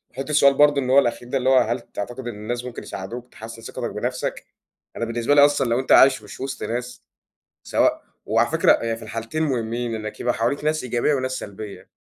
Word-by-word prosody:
حُط 135 +1 -5
السؤال 140 -2 +5
برضه 145 0 +4
إن 130 - -3
هو 135 +2 +7
الأخير 120 -2 -1
ده 135 - 0
اللي 130 0 +1
هو 130 - +6
هل 120 -1 +2
تعتقد 120 +4 -7
إن 120 - -5
الناس 120 +4 -4
ممكن 125 -1 -7
يساعدوك 120 +6 -7
تحسن 115 +1 -10
ثقتك 115 - -5
بنفْسك؟ - - -4 0.5
أنا 115 - -2
بالنسبة 115 +4 0
لي 145 0 +8
أصلًا 145 -3 +1
لو 120 +2 +2
أنت 130 - -3
عايش 130 -4 +6
مش 105 - -11
وسط 135 0 -5
ناس، 125 +2 -4 0.6
سواء - - +1 0.2
وعلى - - +2
فكرة - - +5
يعني 115 -1 -1
في 115 - -13
الحالتين 115 +7 -4
مهمين 120 -4 -2
إنك 110 -1 -6
يبقى 120 - 0
حواليك 120 +6 -1
ناس 155 0 0
إيجابية 125 +4 +1
وناس 130 -1 -2
سلبية. 105 -4 -8
120 Hz, 210 wpm, -23 LUFS, 115-135 Hz, 0.6 s, لي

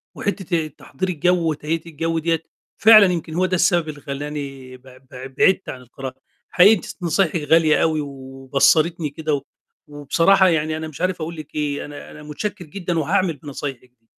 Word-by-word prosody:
وحتة 185 -5 -2
آآ، 155 - -5
تحضير 155 +4 -6
الجَو 175 0 +1
وتهيئة 155 +2 -2
الجَو 165 0 -2
دِيّة 165 0 -1 0.3
فعلًا 215 -2 +8
يمكن 165 -2 -5
هو 185 +2 +1
ده 185 0 0
السبب 175 -3 +2
اللي 145 -1 -8
خلّاني 140 -2 -6
بع 130 0 -17
بع 130 +1 -8
بعِدت 185 +8 +1
عن 130 - -7
القراءة، 130 +1 -8 0.3
حقيقي 190 +4 +6
أنتِ 215 - -2
س - - -9
نصايحِك 170 -1 +1
غالية 160 0 +4
أوي 155 -1 +1
و 145 - -5 0.4
وبصّرتني 150 +4 +2
كده، 155 +1 -3
و 140 - 0 0.5
وبصراحة 165 +7 +3
يعني 155 -1 0
أنا 160 0 -5
مش 155 +1 -10
عارف 185 -2 -1
أقول 165 +2 -5
لِك 155 -2 -11
إيه، 145 -1 -2
أنا 145 0 -10
أنا 150 - -12
مُتشكّر 175 +5 -5
جدًا 175 +1 -3
وهاعمل 180 +2 +1
بنصايحِك 135 -3 -7
دي. 115 - -41
155 Hz, 185 wpm, -21 LUFS, 145-175 Hz, 0.5 s, فعلًا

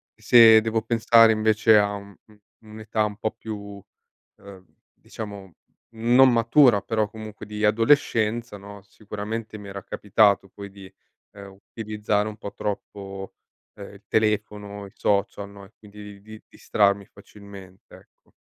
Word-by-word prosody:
se 115 -2 +6
devo 110 0 -2
pensare 115 0 +4
invece 110 0 +3
a 105 0 0
u 100 0 -11
u 105 -1 -22 0.3
un'età 110 0 -3
un 105 -1 -4
po' 110 - -3
più, 100 -2 -9 0.6
ehm, 95 -2 -14 0.3
diciamo, 100 -5 -10 0.4
non 120 +3 +4
matura 115 -1 +4
però 110 -2 -2
comunque 110 -1 -10
di 105 0 -6
adolescenza, 115 -1 +1
no, 100 0 -12
sicuramente 110 +2 -7
mi 100 -1 -11
era 100 0 -8
capitato 100 -1 +1
poi 100 +2 -11
di, 95 -1 -14 0.4
ehm, 100 -1 -12 0.2
utilizzare 105 -1 -2
un 110 0 -8
po' 100 - -9
troppo, 100 -1 -7 0.4
ehm, 100 0 -11
il 100 - -17
telefono, 105 -2 -2
i 95 - -14
social, 100 0 -2
no, 100 -1 -14
e 100 - -20
quindi 105 -1 -13
di 110 +1 -13
distrarmi 100 -1 0
facilmente, 100 -2 -15
ecco. - - -23
105 Hz, 140 wpm, -23 LUFS, 100-110 Hz, 0.6 s, se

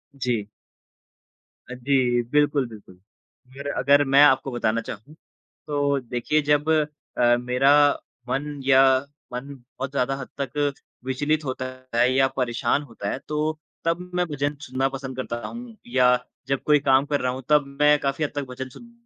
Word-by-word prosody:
जी। 120 -6 -2 1.2
अ, - - -4
जी, 125 -1 +2
बिल्कुल, 145 -3 +2
बिल्कुल। 100 -4 -14 0.6
यार 140 0 -6
अगर 145 +2 +5
मैं 140 - +8
आपको 135 -1 +4
बताना 115 -1 0
चाहूँ, 115 +9 -9 0.5
तो 145 -1 +1
देखिए 125 +5 -1
जब 150 +2 +2 0.5
अ, 120 0 +5
मेरा 125 +3 +2 0.6
मन 140 +3 -1 0.2
या 135 -1 +6 0.5
मन 135 +3 -5
बहुत 130 +1 -8
ज़्यादा 135 0 0
हद - - -7
तक 145 +2 -1 0.3
विचलित 145 +4 0
होता 130 -1 -3 0.3
है 120 +2 +4
या 135 0 +4
परेशान 120 +2 0
होता 115 -6 -6
है, - - -3
तो 155 +1 -1 0.3
तब 165 0 +2 0.2
मैं 180 0 +2
भजन 145 0 -2
सुनना 130 +1 0
पसंद 130 -1 -6
करता 120 -2 -3
हूँ 235 -1 -9
या 125 0 +3 0.4
जब 135 -1 0
कोई 150 -1 +4
काम 135 +1 +5
कर 145 -1 -1
रहा 125 0 0
हूँ, 130 0 -6
तब 150 -2 +4 0.2
मैं 150 0 +6
काफ़ी 140 +2 -1
हद 145 - -1
तक 145 - -1
भजन 130 +1 -6
सुन 235 - -14
135 Hz, 165 wpm, -24 LUFS, 125-145 Hz, 1.2 s, मैं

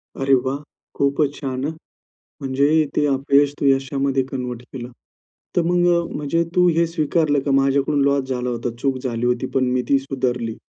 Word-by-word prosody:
अरे 135 0 +1
वाह! 135 +2 -1 0.4
खूपच 140 +1 +1
छान 130 -2 -4
हं. 155 - -1 0.7
म्हणजे 135 +1 +1 0.3
ते 150 - +2
अपयश 140 +1 +2
तू - - -1
यशामध्ये 135 0 +1
कन्व्हर्ट 125 -2 -4
केलं. 125 -1 -7 0.6
तर 175 - +4
मग 175 +1 +2
अ, - - +3 0.2
म्हणजे 160 +3 0
तू 180 0 +5
हे 170 - +4
स्वीकारलं 155 -2 +1
का 140 - +1
माझ्याकडून 140 +1 +1
लॉस 140 -1 +2
झाला 125 -1 -2
होता. 120 0 -2
चूक 135 -2 0
झाली 120 -2 -2
होती 125 +1 0
पण 130 - +3
मी 125 0 +1
ती 140 - +5
सुधारली. 125 -4 -2
135 Hz, 175 wpm, -21 LUFS, 130-145 Hz, 0.7 s, तू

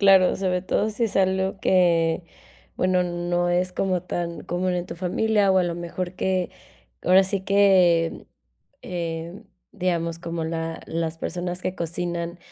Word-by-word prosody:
Claro, 195 -2 +6
sobre 185 -2 0
todo 210 +3 0
si 230 +2 -1
es 220 - -3
algo 190 0 +1
que, 170 -2 +3 0.5
bueno, 185 0 +2
no 175 0 -1
es 180 +1 +1
como 185 -2 0
tan 175 -2 -4
común 180 +1 -1
en 175 0 -2
tu 175 - -7
familia 200 +2 +2
o 190 - +4
a - - +3
lo 175 -1 -1
mejor 175 +1 -4
que, 185 -1 0 0.5
ahora 185 +2 +6
sí 190 0 -1
que, 185 -5 +3 0.6
eh, 170 -1 -5 0.3
digamos, 170 -2 -1
como 170 -1 -4
la 165 0 -3
las 165 0 -3
personas 180 +1 -3
que 185 - -2
cocinan 170 +1 -3
180 Hz, 155 wpm, -24 LUFS, 170-185 Hz, 0.6 s, Claro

